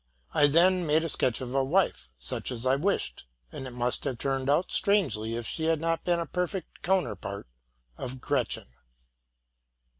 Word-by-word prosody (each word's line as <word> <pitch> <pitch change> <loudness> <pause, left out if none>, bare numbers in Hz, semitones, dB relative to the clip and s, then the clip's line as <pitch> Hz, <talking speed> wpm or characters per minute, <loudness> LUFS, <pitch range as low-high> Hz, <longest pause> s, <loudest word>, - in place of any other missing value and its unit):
'' - - -33
J 145 -2 +6
then 175 +3 +3
made 155 +2 +3
a 165 - -2
sketch 130 -3 0
of 125 0 -5
a 135 0 +2
wife, 140 - 0
such - - -1
as 120 0 -1
I 130 +1 +4
wished; 145 - -1 0.3
and 135 - -7
it - - -8
must 120 0 -1
have 130 -4 -2
turned 135 +1 -1
out 160 +6 +2
strangely 165 - +3
if 120 0 -4
she 160 - 0
had 165 -1 +2
not 165 +1 -1
been 175 -1 +2
a 170 - -2
perfect 180 +1 -4
counterpart 175 - -1 0.5
of 130 0 -5
Gretchen. - - 0
145 Hz, 180 wpm, -28 LUFS, 125-175 Hz, 0.5 s, J